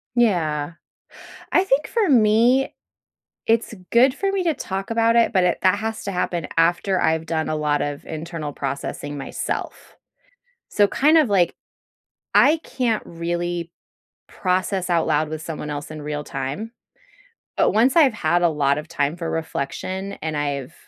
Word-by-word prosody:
Yeah. 165 -10 +1 0.8
I 370 - +4
think 295 -6 +1
for 435 -7 +1
me, 235 +2 +4 0.7
it's 225 0 +1 0.2
good 255 +3 +5
for 390 +5 -1
me 385 -2 0
to 330 -3 +2
talk 195 -5 -5
about 230 0 +3
it, 235 0 +3
but 185 -2 +3
it 180 - +2
that 185 +2 +4
has 220 0 -4
to 200 - -2
happen 175 -3 -2
after 175 +3 +2
I've 160 0 +1
done 160 -1 -2
a 155 - -1
lot 150 -1 0
of 145 -1 -4
internal 160 -2 -5
processing 140 +1 -4
myself. 135 - -5 0.8
So, 205 -1 +4
kind 305 +9 +4
of, 295 -7 +3
like, 180 -4 +3 0.8
I 315 +3 +6
can't 240 -4 -1
really 170 0 -3 0.6
process 185 0 -1
out 170 -2 +2
loud 155 0 +1
with 155 0 -5
someone 155 -2 -5
else 145 0 -5
in 155 -1 -7
real 150 0 -4
time. 140 - -5 0.8
But - - +3
once 245 +7 +3
I've 285 -8 +6
had 175 -2 +1
a 170 - +5
lot 145 -2 +1
of 150 - -6
time 155 -1 -1
for 165 -2 -4
reflection 185 +5 -4
and 155 -1 -2
I've 140 -3 -3
175 Hz, 160 wpm, -22 LUFS, 155-225 Hz, 0.8 s, I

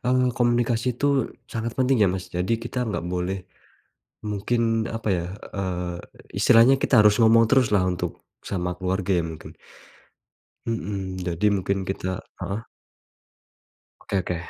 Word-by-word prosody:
mmm, 125 0 +2
komunikasi 120 0 +1
itu 145 - 0 0.5
sangat 115 0 -3
penting 130 0 +3
ya 100 - +5
Mas 95 -1 -4
jadi 90 +5 0
kita 120 - -8 0.2
gak 85 - -3
boleh, 90 +2 -1 0.9
mungkin 105 +4 -1 0.4
apa 115 - -4
ya, 85 - -2 0.3
eee, 90 -2 -3 0.4
istilahnya 115 +4 +6
kita - - +2
harus 105 -1 +5
ngomong 115 0 +6
teruslah 115 -6 +4
untuk 90 -1 -2 0.4
sama 90 -2 -2
keluarga 95 +1 -2
ya 85 - +1
mungkin. 80 - -9 1.2
Mhm, 95 -4 -3
jadi 90 +2 -1
mungkin 100 0 0
kita 95 -1 -4 0.2
heeh. 105 +4 -4 1.4
Oke 100 - -2
oke. 90 - -2
100 Hz, 130 wpm, -24 LUFS, 95-115 Hz, 1.4 s, istilahnya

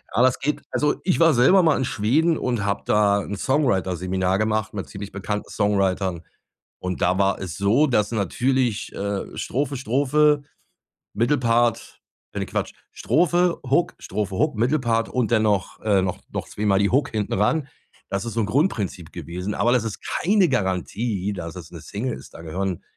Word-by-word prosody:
Ja, 120 - +4
das 130 0 +3
geht, 145 +3 -1
also 150 0 +1
ich 180 - +1
war 165 -3 +5
selber 135 +11 +6
mal 165 -3 +3
in 130 - 0
Schweden 125 +11 +2
und 120 -5 -1
habe 100 0 -1
da 100 -1 +3
'n 100 - -5
Songwriter 120 -9 +1
Seminar 95 +2 0
gemacht 110 0 0
mit 100 -2 -5
ziemlich 100 0 -7
bekannten 105 +1 -4
Songwritern 95 -4 0 0.6
und 90 -1 -4
da 90 +2 +2
war 100 -1 +2
es 90 -6 -6
so, 105 +10 +3
dass 105 -6 +1
natürlich, 115 +1 0
äh, 100 0 -4
Strophe, 140 +1 -2
Strophe, 145 +4 +2 0.7
Mittelpart 120 0 +1 0.3
äh, - - -3
ne, - - -2
Quatsch, - - -3 0.2
Strophe, 175 +6 +2
Hook, 170 +6 +2
Strophe, 100 0 -3
Hook, 150 -2 +1
Mittelpart 120 -1 +1
und 125 -4 0
dann 110 -2 +3
noch, 100 -3 0
äh, 100 -3 +3
noch 90 -1 -2
noch - - -4
zweimal 100 -2 +1
die 100 0 +2
Hook 140 +3 +2
hinten 105 -2 -2
ran. 135 +9 +1 0.4
Das 100 +2 -2
ist 115 - -4
so - - 0
'n - - +1
Grundprinzip 105 - -1
gewesen, 90 +4 -5
aber 120 - +2
das 125 -3 +2
ist 110 - -4 0.2
keine 195 -1 +3
Garantie, 100 -1 -1
dass 85 -3 -6
es 85 -4 -9
'ne 85 - -9
Single 115 - -4
ist. - - -14
Da - - -9
gehören, 90 +2 -3
110 Hz, 180 wpm, -23 LUFS, 95-130 Hz, 0.7 s, selber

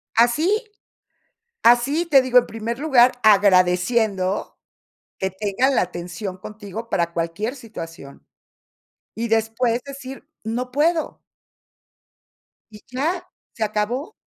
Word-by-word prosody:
Así, 310 - +3 1.0
así, 270 +8 +4
te 275 -5 +5
digo, 250 -1 +4
en 245 - +2
primer 225 +2 -5
lugar, 260 -4 +5
agradeciendo, 195 0 +3 0.6
que 190 0 -1
tengan 210 +7 0
la - - +4
atención 180 +2 -5
contigo 210 +3 -8
para 170 -1 0
cualquier 170 +10 -3
situación, 165 - -10 0.9
y 230 +1 -3
después 225 +2 +1
decir, 275 0 -9 0.2
no 245 +3 -3
puedo. 320 +3 0 1.5
Y 210 - -12
ya, 330 +8 -2 0.3
se 220 - -1
acabó 220 - -2
230 Hz, 105 wpm, -22 LUFS, 195-260 Hz, 1.5 s, te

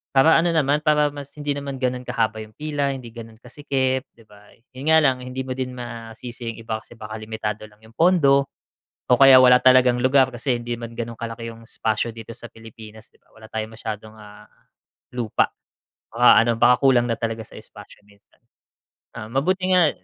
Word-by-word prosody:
Para 155 +5 +6
ano 170 - +1
naman, 145 -1 +2
para 150 -1 +2
mas 145 -1 -8
hindi 145 0 -3
naman 140 -1 -6
gano'n 125 -1 -2
kahaba 115 -3 -1
'yung 110 - -15
pila, 145 -2 -2
hindi 120 -3 -10
gano'n 115 -1 -11
kasikip, 130 0 -2
'di 115 - -20
ba? 105 -1 -19 0.2
'Yon 135 +4 -8
nga 160 - +6
lang 130 -3 +3
hindi 130 +1 -5
mo 130 - -6
din 130 0 -4
masisi 120 0 -8
'yung 115 - -8
iba 110 -1 -3
kasi 120 - -17
baka 110 0 -9
limitado 110 -1 -5
lang 105 - -24
'yung 110 +1 -18
pondo 140 -6 +3 0.6
o 125 - +5
kaya 135 -1 +9
wala 125 0 +7
talagang 130 -1 +5
lugar, 130 0 +4
kasi 125 +1 -1
hindi 120 0 -4
man 115 -1 -7
gano'n 115 0 -5
kalaki 115 0 -6
'yung 115 0 -14
espasyo 110 +1 -2
dito 115 0 -10
sa 120 - -10
Pilipinas, 110 -1 -14
'di - - -29
ba. - - -35
Wala 110 0 -14
tayong 110 0 -5
masyadong, 110 -1 -7
ah, 105 -1 -14 0.7
lupa. 120 -4 0 0.6
Baka 120 -2 +5
ano, 115 - +2
baka 125 +3 +4
kulang 120 -2 +4
na 115 - 0
talaga 115 -1 -3
sa - - -18
espasyo 105 -1 -15
minsan. 100 0 -27 0.8
Ah, 110 - -7
mabuti 185 +8 0
nga, 180 -4 +5
120 Hz, 195 wpm, -22 LUFS, 110-135 Hz, 0.8 s, kaya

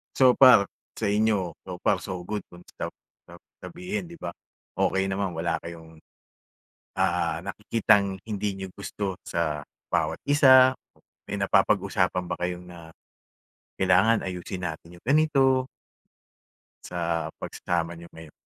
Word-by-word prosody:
So 130 -1 +6
far, 125 -7 +7 0.2
sa 100 - -1
inyo, 105 -5 +1
so 90 - -5
far, - - +3
so 90 -2 -6
good 105 +2 -5
kung 90 0 -15 0.2
sab - - -4 0.3
sab 85 0 -14 0.2
sabihin, 180 +3 -5
'di 170 - -11
ba? 90 - -6 0.5
Okey 95 0 +1
naman. 95 -2 -2
Wala 80 0 -1
kayong, 80 -1 -11 1.0
ah - - 0
nakikitang 100 -4 +1
hindi 105 -2 -3
niyo 95 -1 -7
gusto 100 -1 -5
sa 75 -4 -2 0.2
bawat - - 0
isa, 130 -3 +7 0.5
may - - -5
napapag-usapan 90 - +2
ba - - -2
kayo 90 0 -3
na, 85 -2 -12 0.9
kailangan 95 +4 +3
ayusin 90 0 -5
natin 85 +1 -7
yung - - -22
ganito 135 -2 +3 1.2
sa 85 -2 -2
pagsasama 85 -1 -3
niyo 85 0 -13
ngayon? 80 -2 -12
95 Hz, 130 wpm, -26 LUFS, 85-110 Hz, 1.2 s, far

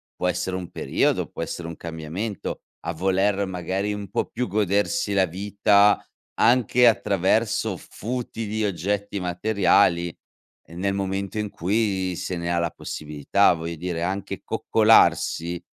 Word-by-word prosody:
può 90 - -1
essere 90 +1 -1
un 90 -2 -6
periodo, - - 0
può - - -6
essere 85 - -5
un 85 - -8
cambiamento, 85 +6 -5 0.2
a 85 - -1
voler 95 +3 +1
magari 95 +3 -2
un 100 -2 -6
po' - - -1
più 125 +2 -3
godersi 105 - 0
la 95 -1 +4
vita 100 +3 +3 0.4
anche 125 +1 +5
attraverso 110 0 +1
futili 110 -1 -4
oggetti 100 +1 -2
materiali, 90 -2 +2 0.5
ehm, 85 +1 -10
nel 100 +1 0
momento 100 +1 -2
in 105 -1 -2
cui 95 -1 0
se 90 +1 -4
ne 85 0 -2
ha 85 - +1
la 85 -1 0
possibilità. 75 +6 +1
Voglio 85 0 -5
dire, 85 0 -3
anche 95 +2 -3
coccolarsi 90 -6 +3
95 Hz, 135 wpm, -24 LUFS, 85-105 Hz, 0.5 s, anche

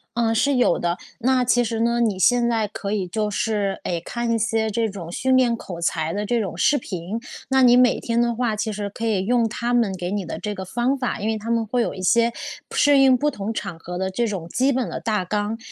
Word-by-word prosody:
呃， 230 -1 +1
是 280 +5 +2
有 250 - +3
的。 175 +1 -1 0.2
那 255 +1 +2
其 245 0 +3
实 225 -1 -2
呢， 235 +1 +2
你 215 -5 +1
现 240 +4 +3
在 225 -2 +1
可 200 0 -5
以 200 -3 -1
就 210 +3 -1
是， 205 -2 -1
哎， 170 -2 -2
看 235 +4 -3
一 230 - +2
些 225 0 0
这 220 +1 0
种 175 -4 -8
训 260 +7 +2
练 245 -2 +3
口 180 -6 -8
才 160 -1 -1
的 205 +1 -2
这 235 +2 +1
种 185 -5 -5
视 290 - +3
频。 190 -1 -5 0.3
那 265 0 +3
你 245 -1 +6
每 250 -1 +4
天 230 0 -1
的 240 0 +1
话， 235 -2 0
其 215 +1 -2
实 205 0 -4
可 225 +3 -5
以 200 -4 0
用 235 +1 +2
他 235 +2 -2
们 230 -6 +2
给 180 0 -4
你 200 -2 -2
的 - - -5
这 210 - -3
个 190 - -6
方 240 +8 0
法， 250 -2 -2
因 210 - -2
为 220 - 0
他 220 +2 -7
们 230 -1 +1
会 240 +3 0
有 - - -1
一 190 - -8
些 235 +5 +3 0.4
适 290 -1 +5
应 270 -1 +6
不 295 +4 +1
同 215 -3 -4
场 195 -6 -5
合 175 +2 -6
的 190 +1 -1
这 230 +5 -1
种 190 -6 -4
基 265 +7 +2
本 255 -2 -1
的 - - -4
大 215 -4 -1
纲。 210 +4 -2
225 Hz, 275 characters per minute, -22 LUFS, 195-240 Hz, 0.4 s, 你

